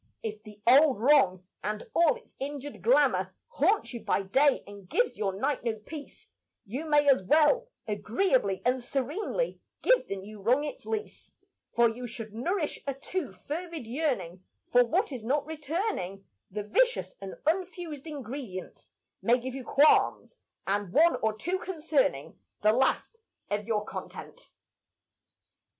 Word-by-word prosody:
If 215 -1 -4
the 210 -1 -13
old 270 +1 +6
wrong 225 -8 +4 0.2
and 210 0 -3
all 335 -2 +4
its - - -16
injured 285 +1 -5
glamour - - +3
Haunts 445 - +1
you 235 - -4
by 200 - 0
day 270 +8 +3
and 200 -2 -12
gives 485 0 +1
your 205 -2 -1
night 275 +3 0
no 230 -2 0
peace, 285 +7 -10 0.4
You 270 +10 -5
may 295 -1 +4
as 270 -7 +6
well, 310 - +4 0.2
agreeably 215 - +1
and 250 +1 +2
serenely, 290 - -2 0.2
Give - - +4
the 195 - -3
new 200 +2 -9
wrong 250 +8 +3
its - - -6
lease; 435 -1 -4 0.4
For 235 -1 +4
should 225 -2 -7
you 225 - -7
nourish 350 +1 -1
a 275 - -1
too 290 - -4
fervid 315 - -6
yearning 225 - -2 0.3
For 245 0 +7
what 350 - 0
is 250 -5 -5
not 280 +5 0
returning, 305 - -3 0.2
The 210 +2 -4
vicious 485 - +1
and 195 -1 -6
unfused 330 -3 -2
ingredient 260 -9 -7 0.3
May 240 +1 +4
give 255 +1 -5
you 265 -1 -6
qualms 300 - +3 0.3
and 200 -1 -1
one 330 - +5
or 220 -1 -1
two 360 +11 -1
concerning 305 - -1 0.2
The 215 0 +5
last 265 - +1 0.3
of 205 +1 -1
your 210 -2 0
content. - - -8
265 Hz, 150 wpm, -29 LUFS, 215-315 Hz, 0.4 s, For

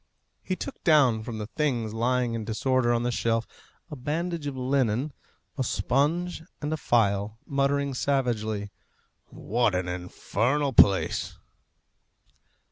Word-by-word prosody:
He 185 - -2
took 275 - -7
down 140 - +4
from 115 0 -6
the 105 - -4
things 120 -4 -1
lying 120 +1 +1
in 115 -1 -3
disorder 120 +3 +1
on 120 0 +1
the 120 - 0
shelf 115 -1 0 0.5
a - - -4
bandage 160 +4 -3
of 135 -2 -4
linen, 130 +1 0 0.5
a - - +2
sponge 155 +9 0 0.2
and 150 +1 -2
a - - +1
phial, 105 -5 +1
muttering 140 0 0
savagely, 110 -7 -1 0.6
"What 115 -2 0
an 90 0 -1
infernal 120 +10 -1
place!" 100 -4 +3
125 Hz, 125 wpm, -27 LUFS, 110-140 Hz, 0.6 s, down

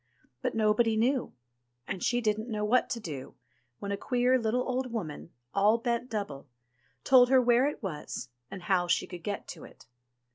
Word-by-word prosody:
But - - -2
nobody 220 +1 +3
knew, 255 +4 +1 0.5
and 190 -2 -4
she 245 0 +1
didn't 215 +1 -1
know 210 -2 -1
what 245 +4 +2
to 240 - -2
do, 145 - -7 0.4
when 200 - -5
a 200 - -1
queer 250 +3 +2
little 235 +2 0
old 255 -1 -2
woman, 170 -10 -5 0.2
all 205 +3 +4
bent 235 +1 -2
double, 195 - -4 0.6
told 250 -2 +6
her 265 0 +6
where 245 +2 +4
it 295 - -5
was, 150 -7 -5 0.2
and 190 -2 -8
how 180 -2 +1
she 175 - +2
could 180 -2 -9
get 205 +1 -4
to - - -8
it. - - -15
220 Hz, 180 wpm, -29 LUFS, 200-245 Hz, 0.6 s, told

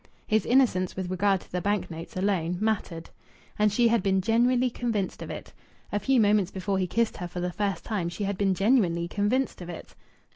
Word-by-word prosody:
His 215 -3 +1
innocence 235 -8 +3
with 185 -1 -4
regard 195 0 +2
to - - -19
the 180 - -2
bank 205 -1 -1
notes 165 +2 -8
alone 180 -3 0
mattered. 195 -6 -2 0.5
And 210 0 +4
she 235 +3 +3
had 230 -2 +2
been 190 0 +2
genuinely 245 +4 +2
convinced 225 -6 -2
of - - -6
it. - - -8 0.4
A 205 - 0
few 255 +5 +2
moments 205 -3 +3
before 190 +1 -2
he 185 - 0
kissed 230 +4 0
her 180 - -4
for 175 +1 -6
the 180 0 -2
first 195 -4 -2
time, 195 -7 -2
she 190 +4 -5
had 200 0 -1
been 195 -1 +1
genuinely 190 -6 +2
convinced 210 +6 0
of 175 - -7
it. 170 - -9
200 Hz, 210 wpm, -27 LUFS, 180-220 Hz, 0.5 s, And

